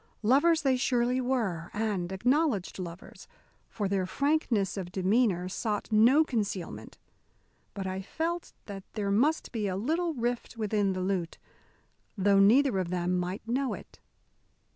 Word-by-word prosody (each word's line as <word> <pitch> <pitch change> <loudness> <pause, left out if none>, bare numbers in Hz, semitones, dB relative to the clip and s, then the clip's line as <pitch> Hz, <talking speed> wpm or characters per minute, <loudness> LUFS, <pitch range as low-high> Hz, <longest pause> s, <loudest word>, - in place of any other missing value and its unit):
Lovers 295 +9 +4
they 265 -2 +3
surely 250 0 +1
were, 220 -10 -1
and 205 -5 -1
acknowledged 230 - 0
lovers, 175 -1 -9 0.4
for 205 -3 -2
their 190 -1 0
frankness 270 -5 0
of 185 -3 -5
demeanour 190 -1 +1
sought 210 +3 -3
no 240 +8 +6
concealment; 205 - -4 0.8
but 195 -2 -4
I 190 0 -3
felt 330 - -3
that 195 -2 -8
there 205 -2 -2
must 285 +10 +1
be 215 -4 -2
A 185 - -2
little 325 - -1
rift 240 0 -3
within 210 -3 0
the 185 - -3
lute, 185 -3 -2 0.8
though 200 0 +4
neither 225 +2 +5
of 180 -2 -2
them 180 0 0
might 180 +5 -4
know 255 +2 0
it. - - -14
210 Hz, 140 wpm, -29 LUFS, 190-255 Hz, 0.8 s, no